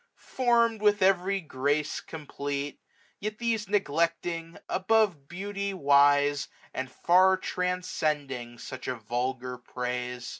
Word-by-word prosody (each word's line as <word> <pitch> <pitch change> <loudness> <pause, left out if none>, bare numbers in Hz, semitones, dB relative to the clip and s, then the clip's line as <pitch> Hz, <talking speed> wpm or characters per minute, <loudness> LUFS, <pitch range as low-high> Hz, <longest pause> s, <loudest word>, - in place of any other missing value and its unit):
form'd 235 -3 +1
with 210 -1 +4
every 195 +1 +3
grace 145 -1 -1
complete} 145 -2 -5 0.4
Yet 215 +1 -4
these 225 -4 -1
neglecting, 170 -2 0
above 190 -7 +2
beauty 200 +2 -4
wise. 145 -2 +4 0.3
And 130 -1 -4
far 185 +5 +4
transcending 150 -10 -2
such 130 +2 -8
a 130 - -1
vulgar 125 +2 -3
praise. 125 0 -4
160 Hz, 105 wpm, -28 LUFS, 135-195 Hz, 0.4 s, with